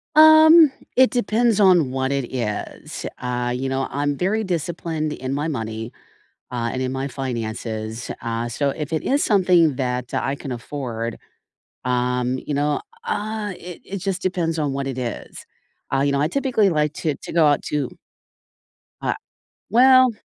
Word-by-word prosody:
Um, 315 0 +8 0.2
it 260 0 +6
depends 235 -1 +1
on 180 -8 +5
what 130 0 -1
it 140 -3 -2
is, 115 -5 -4 0.2
uh, 125 0 -2
you 130 +2 -2
know, 135 0 -1
I'm 145 +1 -1
very 200 +8 0
disciplined 165 -3 -2
in 130 -1 -4
my 145 +3 -1
money, 115 -5 -4 0.6
uh, 120 -1 -1
and 130 - -3
in 130 0 -2
my 135 +1 -2
finances, 115 -3 -4
uh, 115 0 -2
so 140 +4 -1
if 150 +2 -5
it 160 - 0
is 280 +2 +1
something 180 -7 +4
that 125 -2 -2
I 135 - -1
can 135 -2 -6
afford, 115 -2 -5 0.7
um, 125 0 0
you 150 - -1
know, 145 +1 +1 0.2
ah, 215 0 -3
it 175 0 -9
it 200 - -6
just 190 0 -3
depends 175 -3 -1
on 150 -3 0
what 135 0 -3
it 135 -2 -4
is, 120 -3 -6 0.5
uh, 135 - +3
you 140 +1 +2
know, 140 - +1
I 150 - +1
typically 250 -4 +2
like 150 -3 +1
to 155 -3 -1
to - - -7
go 165 -2 +5
out 145 - +3
to 145 -4 -2 1.1
Ah - - 0 0.5
Well 255 +3 +6
145 Hz, 165 wpm, -22 LUFS, 125-185 Hz, 1.1 s, Um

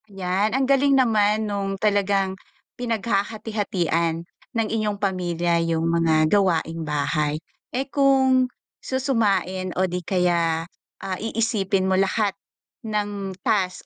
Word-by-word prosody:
'Yan, 195 +4 0
ang 270 - +2
galing 275 +1 +4
naman 215 -3 +3
nung 200 -1 -2
talagang 200 -2 +1 0.4
pinaghahati-hatian 205 -7 -1 0.3
ng 225 -1 +1
inyong 215 -2 -1
pamilya 175 -4 0
yung 165 -1 0
mga 165 -2 +3
gawaing 170 -5 +1
bahay. 150 0 -1 0.3
Eh, 265 +2 -2
kung 265 -2 +3 0.3
susumain 210 -8 0
o 185 - +3
di 180 0 -3
kaya, 170 -3 +1 0.4
ah, 190 -1 -3
iisipin 215 -4 0
mo 190 - +1
lahat 195 +1 +1 0.5
ng 205 -4 -3
task 185 -3 0
195 Hz, 115 wpm, -23 LUFS, 175-220 Hz, 0.5 s, galing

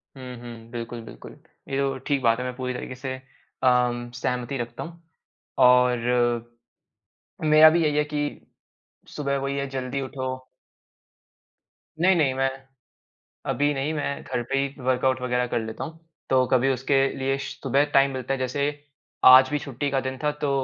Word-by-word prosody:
हुँ, 130 -1 -8
हुँ 115 -1 -10
बिल्कुल, 120 0 -6
बिल्कुल। - - -11 0.4
ये 135 - -1
तो 135 -1 0
ठीक 140 -2 +1
बात 115 +1 +3
है - - -2
मैं 125 0 -4
पूरी 125 -1 -3
तरीके 125 +1 -6
से 130 0 -5 0.5
अम, 125 -1 +2
सहमति 125 +2 -2
रखता 120 0 -5
हूँ, 170 0 -11 0.6
और 125 -2 +3 1.0
मेरा 155 +1 +8
भी 170 +1 +2
यही 150 -1 +1
है 150 - +3
कि 150 0 -3 1.0
सुबह 140 -2 -1
वही 140 +1 -2
है 140 0 -2
जल्दी 135 0 -3
उठो। 130 -1 -4 1.7
नहीं, 190 +1 +5
नहीं 140 -5 +2
मैं 135 0 +1 1.0
अभी 145 +3 +1
नहीं, 140 +3 -1
मैं 145 -2 -3
घर 120 - -3
पे 135 - +2
ही 140 -1 -3
वर्कआउट 130 0 +1
वग़ैरह 125 0 0
कर 120 - -1
लेता 110 0 -5
हूँ, 160 0 -9 0.3
तो 130 -1 +4
कभी 130 +1 +4
उसके 135 +2 +1 0.2
लिए 135 +1 0
श 140 - -5
सुबह 140 +2 +3
टाइम 135 0 +5
मिलता 130 0 -3
है - - -4
जैसे 140 +3 -1 0.6
आज 130 +1 +9
भी 150 - 0
छुट्टी 140 0 -4
का 135 - +1
दिन 130 0 -5
था 150 - +3
तो 145 - +1
130 Hz, 170 wpm, -25 LUFS, 125-140 Hz, 1.7 s, आज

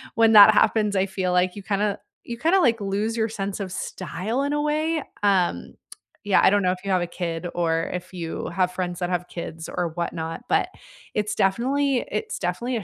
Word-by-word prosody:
when 225 -1 +4
that 210 +1 +10
happens, 210 -1 +2
I 190 0 +2
feel 185 -1 -2
like 180 +1 +2
you 205 - -7
kinda 205 +1 -1 0.3
you 235 -1 -6
kinda, 335 +9 +3
like, 235 -7 +3
lose 205 +3 -1
your 225 0 +1
sense 200 -2 -4
of 190 -2 -4
style 195 +7 -3
in 285 +1 -1
a 295 - 0
way, 310 +2 0 0.2
um 180 - +1 0.5
yeah, 200 -2 +4
I - - +7
don't 205 +1 +3
know 180 -1 +2
if 185 - -8
you 195 - -2
have 185 -1 +2
a 175 - -2
kid 170 -1 -4
or 165 -1 0
if 180 +1 -6
you 170 -3 -5
have 180 -1 0
friends 180 -1 -3
that 175 0 -2
have 180 0 -2
kids 165 -1 -7
or 175 -1 -2
whatnot, 165 0 -4
but - - +2 0.5
it's 210 0 -1
definitely 260 +6 +1
it's 210 - -3
definitely 200 +8 -2
a 210 - -5
195 Hz, 210 wpm, -24 LUFS, 180-225 Hz, 0.5 s, that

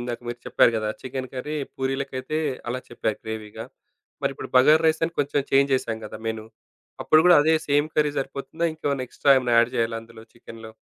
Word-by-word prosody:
ఇందాక 120 -1 -5
మీరు 120 0 -5
చెప్పారు - - +4
గదా! 110 -1 -2
చికెను 130 0 -5
కర్రీ 150 +4 -4 0.2
పూరీలకైతే 135 +2 -3 0.3
అలా 130 +1 -3
చెప్పారు 110 -2 -3
గ్రేవీగా. 110 -1 -6 0.6
మరిప్పుడు - - -3
బగార్ 155 +5 +6
రైసని 160 +1 +1
కొంచెం 145 0 +1
చేంజ్ 140 0 +3
చేసాం 115 -3 -2
గదా! 105 - -8
మెను. 110 -1 -4 0.6
అప్పుడు 155 - +5
కూడా 175 -2 +8
అదే 160 +2 +3
సేమ్ 145 +1 +3
కర్రీ 150 -1 +2
సరిపోతుందా? 140 +5 -4
ఇంకేమన్నా 140 -4 -3
ఎక్స్ - - -22
స్ట్రా 140 - +6
ఏమ‌న్నా 125 -2 0
యాడ్ 115 +1 +4
చేయాలా 115 0 0
అందులో 115 -1 -14
చికెనులో? 115 -1 -12
130 Hz, 175 wpm, -24 LUFS, 115-145 Hz, 0.6 s, కూడా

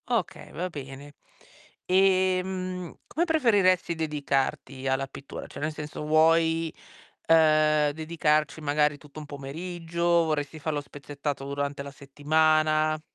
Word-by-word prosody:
Okay, - - -2
va 180 - -3
bene. 140 -2 -9 0.7
Ehm, 185 -1 +1
come 335 +3 0
preferiresti 205 - +3
dedicarti 140 -3 -2
alla 135 +1 0
pittura? 135 +1 -9
Cioè - - -10
nel 155 +1 -1
senso 150 0 -6
vuoi, 160 +1 +3 0.5
ehm, 155 -2 +4
dedicarci 155 -1 0
magari 150 0 +1
tutto 150 +1 -12
un 150 - -8
pomeriggio, 165 +4 -6 0.2
vorresti 155 0 -2
farlo 150 -1 -2
spezzettato 145 0 -6
durante 140 0 -3
la 140 - -8
settimana? 155 +2 +1
155 Hz, 115 wpm, -27 LUFS, 145-165 Hz, 0.7 s, ehm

